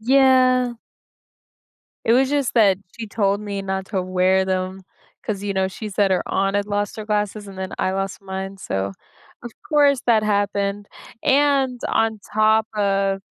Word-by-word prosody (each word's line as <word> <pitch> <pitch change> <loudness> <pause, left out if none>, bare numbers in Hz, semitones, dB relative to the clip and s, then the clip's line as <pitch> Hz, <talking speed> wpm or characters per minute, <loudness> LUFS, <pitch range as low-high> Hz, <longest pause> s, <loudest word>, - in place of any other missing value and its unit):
Yeah. 255 -1 +4 1.3
It 225 - +4
was 265 +2 +3
just 285 -4 0
that 200 -5 +4 0.2
she 225 -2 -6
told 200 -1 0
me 200 -2 -4
not 190 0 -3
to 195 -3 -2
wear 185 +1 +2
them 185 0 -2 0.4
'cause, 200 -2 -3
you 200 -1 -2
know, 190 0 +1
she 210 +3 -7
said 195 -1 +1
her 185 - +1
aunt 195 +1 0
had 205 0 0
lost 205 0 -2
her 215 - -6
glasses 210 -1 -2
and 190 -1 -10
then 190 0 -5
I 185 - +1
lost 195 +1 -3
mine, 190 0 -6
so, 95 - -3 0.5
of 240 - -7 0.2
course 285 -4 +3
that 225 -3 +4
happened, 205 -1 -1 0.4
and 275 -3 +2
on 220 -2 0
top 215 +1 +3
of 195 -1 +1
205 Hz, 165 wpm, -21 LUFS, 195-230 Hz, 1.3 s, Yeah